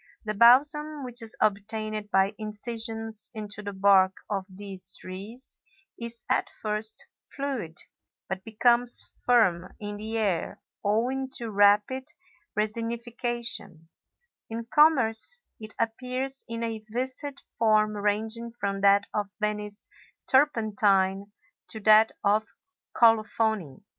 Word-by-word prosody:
The 215 - -1
balsam, 290 +6 +4
which 245 -1 -2
is 225 -1 -1
obtained 215 +1 -1
by 195 +1 +2
incisions 225 0 -1
into 210 -1 -6
the 205 -1 -5
bark 190 -1 +4 0.2
of 195 -2 -2
these 190 0 -4
trees, 200 +8 -6 0.4
is 235 0 -4
at - - +1
first 215 0 -2 0.3
fluid, 265 - -4 0.5
but 190 0 -4
becomes 240 +2 +3 0.2
firm 185 -8 +3
in 205 -1 -5
the 220 +2 -3
air 195 -7 -1 0.2
owing 250 +6 0
to 235 -3 -4
rapid 210 +6 +3 0.5
resinification; 230 -5 -2 0.6
in 230 +1 -5
commerce 295 - +3 0.2
it 215 -1 -8
appears 255 +4 -2
in 230 0 -4
a 225 -1 -3
viscid 260 +4 -2 0.2
form 215 -1 +3
ranging 220 +3 -2
from 195 0 -2
that 200 0 +5
of 205 -1 -2
Venice 210 0 -3 0.4
turpentine 205 -7 +2 0.4
to 220 - -7
that 215 +1 +6
of 210 +2 +2 0.5
colophony. 220 - +2
220 Hz, 115 wpm, -27 LUFS, 205-235 Hz, 0.6 s, that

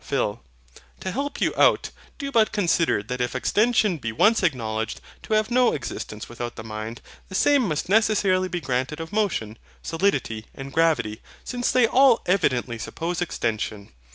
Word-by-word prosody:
PHIL. 120 -7 -1 0.6
To 185 - -3
help 280 +6 -3
you - - +1
out, - - +3 0.3
do 280 -1 -4
but 225 -4 +3
consider 170 - +1
that 125 +3 -4
if 125 +1 -2
EXTENSION 215 - +2
be 115 -4 -3
once 215 - +3
acknowledged 115 - -1 0.2
to 215 - -1
have 215 +2 +1
no 250 0 +4
existence 110 -5 -5
without 120 0 -6
the - - -7
mind, 110 +2 -6 0.3
the 190 - -6
same 280 +1 +4
must 155 0 -2
necessarily 195 -3 +3
be 175 -2 -4
granted 130 +2 -2
of 165 +4 -7
motion, 170 - -1 0.2
solidity, 145 - -1
and 135 0 -8
gravity; 135 -11 +1 0.2
since 245 -1 -2
they 255 -2 +4
all 255 0 +5
evidently 130 -10 +1
suppose 170 +9 -4
extension. 110 - -3
165 Hz, 160 wpm, -24 LUFS, -, 0.6 s, all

